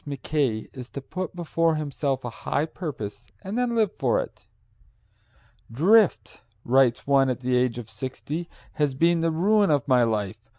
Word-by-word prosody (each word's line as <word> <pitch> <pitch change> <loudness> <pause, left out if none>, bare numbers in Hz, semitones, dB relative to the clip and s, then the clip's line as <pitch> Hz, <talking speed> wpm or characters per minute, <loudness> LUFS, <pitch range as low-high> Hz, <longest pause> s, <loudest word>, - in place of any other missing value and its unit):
Mackay 140 -5 -2
is 125 -2 -9
to - - -4
put 180 +6 -6
before 165 -1 +1
himself 140 -3 -2
a - - -3
high 145 - 0
purpose 145 - -7 0.2
and 195 +2 -5
then 245 -1 0
live 220 -4 +2
for - - +1
it. - - -7 1.2
"Drift," 190 - +3 0.2
writes 125 -1 +3
one 135 -1 +4
at 125 -1 -2
the 125 0 0
age 125 -1 +1
of 120 -3 -7
sixty, 130 +9 -5 0.2
"has 145 -3 0
been 170 +4 +3
the 165 - +2
ruin 200 +5 +3
of 145 -1 +1
my 130 -2 +4
life. 110 -2 -1
140 Hz, 165 wpm, -25 LUFS, 125-170 Hz, 1.2 s, one